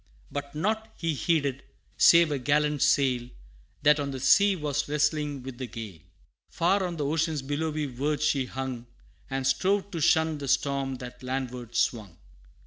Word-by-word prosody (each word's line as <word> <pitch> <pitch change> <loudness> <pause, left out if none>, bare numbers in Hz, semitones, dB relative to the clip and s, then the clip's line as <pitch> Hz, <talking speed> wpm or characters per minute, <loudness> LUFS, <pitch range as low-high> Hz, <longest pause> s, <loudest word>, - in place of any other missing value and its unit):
But 140 0 -5
nought 220 +7 -1
he 165 -2 -1
heeded, 140 -3 0 0.3
save 170 -2 +6
a 145 - -1
gallant 150 +2 +1
sail 125 -3 +2 0.5
That 150 +1 +5
on 140 -1 -2
the 135 -1 -5
sea 200 +8 +5
was 150 -4 -2
wrestling 150 -2 0
with 130 -1 -8
the 130 - -4
gale. 110 -7 -8 0.5
Far 190 +4 +1
on 175 -2 -3
the 145 - -2
ocean's 155 -1 0
billowy 150 +2 -2
verge 145 +3 -2
she 140 -3 +1
hung, 130 -2 -5 0.4
And 135 0 -2
strove 195 +9 +1
to 170 -4 -4
shun 160 0 +3
the 140 - -5
storm 135 0 0
that 125 -1 -10
landward 125 -2 -5
swung. 105 -6 -1
145 Hz, 160 wpm, -27 LUFS, 130-155 Hz, 0.5 s, save